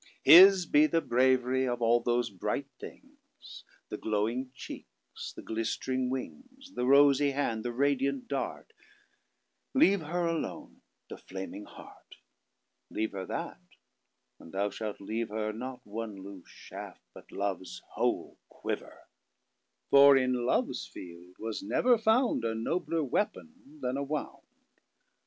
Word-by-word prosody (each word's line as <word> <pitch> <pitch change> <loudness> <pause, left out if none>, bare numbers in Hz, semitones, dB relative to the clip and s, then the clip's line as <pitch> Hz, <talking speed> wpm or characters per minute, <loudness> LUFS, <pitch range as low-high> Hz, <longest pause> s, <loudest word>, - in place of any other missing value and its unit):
His 185 +1 +9
be 150 -1 +4
the 165 - +2
bravery 130 -1 +2
of 120 -1 -2
all 120 0 +3
those 120 -1 0
Bright 95 - -3
things. - - -13 0.3
The - - -5
glowing 110 +5 -1
cheekes, - - -10
the - - -9
glistering 125 +3 -2
wings; 260 - -7
The 125 - -2
Rosy 140 +1 +5
hand, 115 -6 -1
the 120 - -2
radiant 140 +1 0
Dart; 140 - -4 1.0
Leave 200 - +5
Her 170 +3 -2
alone 165 -1 -4 0.3
The - - -9
Flaming 95 +2 -8
Heart.Leave 110 0 -10
her 95 -2 -6
that; - - -5 0.8
and 80 - -13
thou 100 +1 -1
shalt 105 0 -5
leave 110 +3 -3
herNot 110 +4 -5
one 110 0 -6
loose 95 -2 -11
shaft - - -10
but - - -15
love's 100 -2 -4
whole - - -2
quiver. - - -6 0.9
For 140 0 +8
in 125 -2 0
love's - - 0
feild 90 +5 -12
was 110 -1 -5
never 230 - +2
foundA 220 - +2
nobler 165 +7 -1
weapon 245 - -4
then 130 - -1
a 140 - -2
Wound. 145 +1 -5
125 Hz, 125 wpm, -30 LUFS, 110-150 Hz, 1.0 s, His